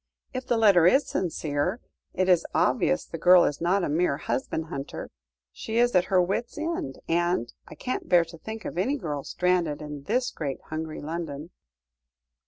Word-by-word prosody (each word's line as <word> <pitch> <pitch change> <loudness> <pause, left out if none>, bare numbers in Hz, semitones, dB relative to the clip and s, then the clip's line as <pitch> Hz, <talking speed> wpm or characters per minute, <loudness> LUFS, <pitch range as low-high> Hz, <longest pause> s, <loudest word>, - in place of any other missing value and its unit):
If 255 0 -5
the 240 - +2
letter 195 -6 +6
is 270 +9 +4
sincere, 165 +2 -1 0.4
it 185 - +1
is 180 -3 +4
obvious 75 - +2
the 165 - -7
girl 180 +1 +7
is 145 - -1
not 185 +3 +2
a - - +1
mere 155 -1 +1
husband 160 +4 -2
hunter; 140 -4 -6 0.4
she 225 +1 -4
is 240 +1 +4
at 180 -1 +4
her 185 - +3
wits' 195 - -1
end, 310 - -3
and 175 -7 0
I - - -11
can't 255 - -4
bear 175 -2 +5
to 165 0 -13
think 220 +3 -7
of 175 - -4
any 255 +10 +1
girl 150 - -4
stranded 180 -5 0
in 150 -2 -8
this 250 +3 0
great 140 -4 -4
hungry 155 0 -4
London. 160 0 -5
175 Hz, 180 wpm, -26 LUFS, 155-200 Hz, 0.4 s, girl